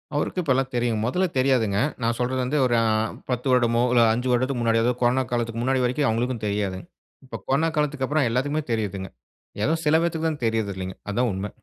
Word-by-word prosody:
அவருக்கு 165 +5 -1
இப்பல்லாம் 135 -4 0
தெரியும். 120 -3 0
மொதல 180 +10 +1
தெரியாதுங்க. 125 -7 +2 0.2
நான் 115 0 0
சொல்றது 125 +1 -1
வந்து 140 +4 -1
ஒரு 120 -1 +2
ஆ - - +2 0.5
10 125 +2 -2
வருடமோ 120 -2 +3
இல்ல, 120 - +5
5 125 +3 -2
வருடத்துக்கு 125 0 0
முன்னாடி, 115 -1 +2
அதாவது 125 +1 0
கொரோனா 125 +2 +3
காலத்துற்கு 115 -1 -2
முன்னாடி 130 0 +1
வரைக்கும் 130 +3 +1
அவங்களுக்கும் 115 0 -1
தெரியாது. 100 -2 -2 0.5
இப்போ 130 - -7
கொரோனா 150 +5 +2
காலத்துக்கப்புறம் 145 -1 +1
எல்லாருக்குமே 145 +6 -1
தெரியுதுங்க. 100 -4 -2 0.6
ஏதோ 160 - +2
சில 150 +1 +4
பேருக்கு 165 -1 -1
தான் 145 -6 -5
தெரியறது 110 -3 0
இல்லங்க. 95 0 -5
அதுதான் 120 +4 0
உண்மை. 95 +2 -4
125 Hz, 185 wpm, -24 LUFS, 115-135 Hz, 0.6 s, இல்ல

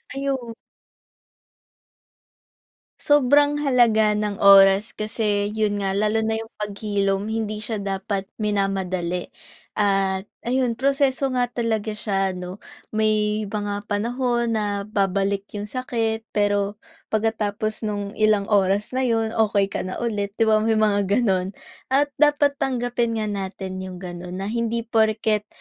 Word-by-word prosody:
Ayun. 270 -4 -3 2.5
Sobrang 290 +1 +4
halaga 230 -6 +4
ng 210 -1 -2
oras 195 +1 +7
kasi 215 -2 -1
yun 210 -2 0
nga 195 -1 -1
lalo 215 +2 +1
na 220 0 0
yung 225 0 -6
paghilom 205 0 -1
hindi 215 -1 -3
siya 220 0 -3
dapat 195 0 -3
minamadali 190 -4 -1 0.4
at 195 -1 0 0.2
ayun 250 -1 0
proseso 275 +1 +1
nga 250 -1 +1
talaga 220 -3 -2
siya 195 -3 -1
'no? 180 +2 -7 0.3
May 215 -1 +1
mga 205 0 -4
panahon 235 +2 0
na 205 -2 -1
babalik 200 -1 0
yung 205 - -3
sakit, 225 -1 -2
pero 205 0 +1 0.3
pagkatapos 215 0 -1
nung 205 -1 -3
ilang 215 -1 +2
oras 200 0 +2
na 255 - -1
'yon, 225 -1 +1
okey 205 -3 +1
ka - - -2
na 185 - -4
ulit, 205 -3 -2
'di 225 - +2
ba 220 -1 +4
may 220 +1 +1
mga 210 -2 +3
ganun? 195 -3 +1 0.3
At 285 +2 +2
dapat 290 -1 +3
tanggapin 245 -2 -1
nga 215 -1 -2
natin 190 -1 -5
yung 185 -1 -6
ganun, 180 0 -7
na 205 - -3
hindi 230 0 -1
porket 220 -2 +1
215 Hz, 130 wpm, -23 LUFS, 200-230 Hz, 2.5 s, oras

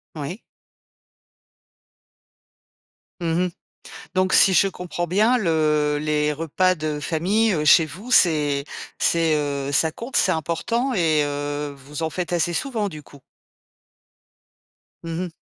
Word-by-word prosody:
Oui. 160 +8 -6 2.8
Mmh 170 +2 0
mh, - - -2 0.7
donc 185 0 +2
si 190 - +6
je 190 +3 +4
comprends 175 -1 -5
bien 215 +8 +3
le 155 -5 +1
les 150 0 0
repas 175 +4 +1
de 155 -2 -4
famille 190 +6 +1
chez 160 +2 +6
vous, 200 - -10
c'est 150 - +3 0.3
c'est 165 -2 +2
heu 140 -1 -2
ça 160 +2 +2
compte, 240 +3 -6
c'est 185 - +3
important 230 - -1
et 160 -7 +2
heu, 145 0 -3
vous 145 +4 -8
en 160 - -1
faites 175 +2 -3
assez 175 0 0
souvent 215 -1 -2
du 155 -2 -9
coup? 140 0 -17 1.8
Mmh 165 +1 -4
mh. - - -7
165 Hz, 130 wpm, -22 LUFS, 150-185 Hz, 2.8 s, si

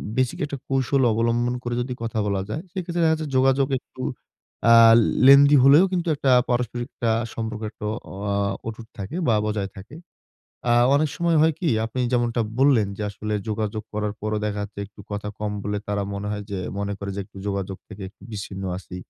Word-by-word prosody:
basic 130 -2 0
একটা 140 -1 -5
কৌশল 135 0 +1
অবলম্বন 120 +2 +1
করে 120 0 -2
যদি 125 +1 -3
কথা 115 -1 -2
বলা 100 -1 0
যায়, 145 - -3
সেক্ষেত্রে 175 -2 -3
দেখা 160 - +4
যাচ্ছে 155 -1 -3
যোগাযোগ 135 +1 +3
একটু 130 - -13 0.7
আ - - +9 0.5
lengthy 140 +1 +8
হলেও 145 +6 +7
কিন্তু 175 -2 -1
একটা 135 -1 +1 0.2
পারস্পরিক 120 0 -1 0.2
আ - - +3 0.2
সম্পর্ক 110 -1 -4
একটা 105 - -9 0.4
আ 100 - 0 0.3
অটুট 115 0 -7
থাকে 100 - -6
বা 115 - +4
বজায় 105 -2 -2
থাকে। 100 +9 -11 0.8
আ - - +5 0.2
অনেক 150 +1 +2
সময় 170 -2 +2
হয় 160 0 +4
কি? 170 - +1 0.2
আপনি 115 +3 -5
যেমনটা 120 -1 +1 0.2
বললেন 130 -7 +4
যে - - -5
আসলে 105 +1 -5
যোগাযোগ 110 0 -2
করার 105 -1 -2
পরও 110 0 -1
দেখা 105 -1 -2
যাচ্ছে 100 0 -9
একটু 105 +1 -21
কথা 105 0 -4
কম 105 0 -2
বলে 105 0 -2
তারা 100 -1 -1
মনে 100 +1 -4
হয় 105 0 -4
যে, 100 - -2 0.2
মনে 100 0 -2
করে 100 0 -4
যে - - -4
একটু 100 -1 -16
যোগাযোগ 100 -1 -3
থেকে 105 -1 -11
একটু - - -33
বিচ্ছিন্ন 100 -2 -6
আছি। 95 -1 -10
115 Hz, 190 wpm, -23 LUFS, 105-135 Hz, 0.8 s, আ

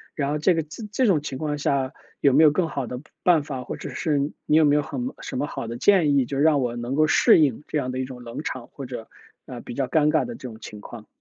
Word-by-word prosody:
然 140 -2 -1
后 150 - 0
这 165 +5 +3
个 165 - 0 0.3
这 255 +1 +2
种 160 -7 +3
情 135 -3 -5
况 150 -1 -2
下 135 -2 0 0.3
有 140 -2 +4
没 155 +3 +6
有 150 - +7
更 165 +3 0
好 140 -4 -3
的 125 +1 -6 0.2
办 165 -5 +4
法， 135 -3 -5
或 - - -6
者 - - -7
是 150 -3 0 0.3
你 150 - +4
有 160 - +5
没 145 0 +4
有 150 - +3
很 245 - -4
什 - - -5
么 145 +2 -1
好 115 - -5
的 115 +1 -5
建 155 -2 +4
议， 135 - +3
就 135 +3 -4
让 150 0 +4
我 120 -2 -1
能 120 +3 -3
够 155 0 +4
适 - - +5
应 145 -3 +2
这 - - -3
样 130 -3 -2
的 130 - -3
一 - - 0
种 130 -1 -9
冷 120 +6 -7
场， 125 -2 -5
或 140 - -9
者， 120 -3 -8 0.4
呃， - - -8
比 - - -8
较 135 -1 -1
尴 150 +2 +3
尬 - - +2
的 240 - -6
这 130 - -8
种 110 - -11
情 105 -1 -10
况。 110 -1 -10
140 Hz, 305 characters per minute, -24 LUFS, 125-155 Hz, 0.4 s, 有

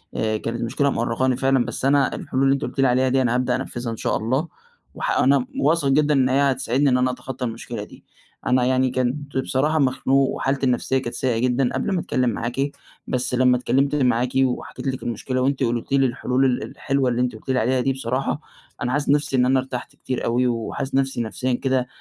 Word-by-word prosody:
آآ، 110 -1 0
كانت 115 +2 -4
مشكلة 140 +5 +1
مأرّقاني 125 +1 0
فعلًا، 135 -2 +2
بس - - -4
أنا 140 0 +3
الحلول 130 +1 -2
اللي 135 0 +4
أنتِ 140 - -2
قُلتِ - - -5
لي 135 - +5
عليها 130 +1 +2
دي 130 +1 +2
أنا 120 -1 +1
هابدأ 125 0 +1
أنفّذها 120 -2 -4
إن 115 - -5
شاء - - 0
الله 130 +9 -1 0.5
وه - - -8 0.2
أنا 140 - +3
واثق 165 - +2
جدًا 150 +2 +3
إن 130 -2 +3
هي 140 +1 +3
هتساعدني 130 +2 +1
إن 125 - +3
أنا 125 0 +2
أتخطّى 125 0 -6
المشكلة 115 -2 -5
دي، - - -14 0.4
أنا 125 0 +3
يعني 130 0 +2
كنت 130 +3 -2
بصراحة 145 +4 +1
مخنوق 135 0 +2
وحالتي 135 0 -1
النفسية 130 +1 +1
كانت 120 -3 -4
سيئة 125 -4 0
جدًا 125 +1 +1
قبل - - -1
ما 185 - +1
أتكلّم 125 -5 0
معاكِ، 125 +5 -2 0.4
بس 125 0 -2
لمّا 125 0 +4
اتكلّمت 140 +3 +1
معاكِ 125 -3 +2
وحكيت 135 +1 -1
لِك 130 -1 -3
المشكلة، 130 +3 -2
وأنتِ 135 +1 +1
قُلتِ 120 +1 -2
لي 135 -1 +4
الحلول 130 +1 0
ال 125 -2 +1
الحلوة 135 -2 -1
اللي 120 +1 0
أنتِ 125 -2 -1
قُلتِ 110 - -13
لي 130 -1 +2
عليها 125 +3 +1
دي 135 +2 +1
بصراحة، 130 +3 -2 0.4
أنا 125 -2 -1
حاسس 145 +1 -1
نَفسي 145 -1 +2
إن 125 - +4
أنا 130 +1 +3
ارتحت 130 -1 -6
كتير 130 -2 -4
أوي 125 +2 +2
وحاسس 125 +4 -3
نفسي 135 -3 0
نفسيًا 125 +3 -2
كده 130 0 0
130 Hz, 215 wpm, -22 LUFS, 125-135 Hz, 0.5 s, لي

